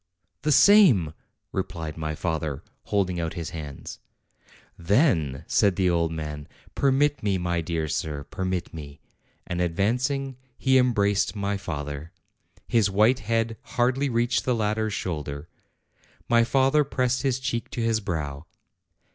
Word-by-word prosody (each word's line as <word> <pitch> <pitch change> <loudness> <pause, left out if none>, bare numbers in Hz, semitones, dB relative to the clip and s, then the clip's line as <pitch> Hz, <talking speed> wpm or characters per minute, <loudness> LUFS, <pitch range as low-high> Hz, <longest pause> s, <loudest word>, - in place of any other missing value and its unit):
"The 150 +2 +1
same," 145 - +6 0.4
replied 80 -2 -4
my 80 -1 -3
father, 80 -4 -3 0.2
holding 95 -4 0
out 80 -1 -3
his 85 -2 -5
hands. 75 -4 -8 0.8
"Then," 85 - +1
said 100 0 +2
the 95 -2 +2
old 85 -1 +1
man, 75 -2 -5 0.3
"permit 140 +2 +2
me, 100 -2 +1
my 85 -1 -1
dear 80 -1 -2
sir, 75 -1 -3
permit 95 +3 -3
me;" 75 -2 -9 0.5
and 90 0 -3
advancing, 125 - 0 0.2
he 130 0 +4
embraced 105 -5 +2
my 100 0 -1
father: 75 -3 -5 0.6
his 115 -3 +3
white 110 +6 +3
head 115 0 -1 0.2
hardly 130 +3 +2
reached 120 0 +1
the 125 - +1
latter 110 0 0
s 105 - -4
shoulder. 75 -5 -4 0.8
My 115 -1 +4
father 135 +4 +3
pressed 130 -3 0
his 135 -3 +1
cheek 120 -2 -3
to 125 - -4
his 115 -1 +2
brow. 80 -6 -4
100 Hz, 140 wpm, -25 LUFS, 80-120 Hz, 0.8 s, same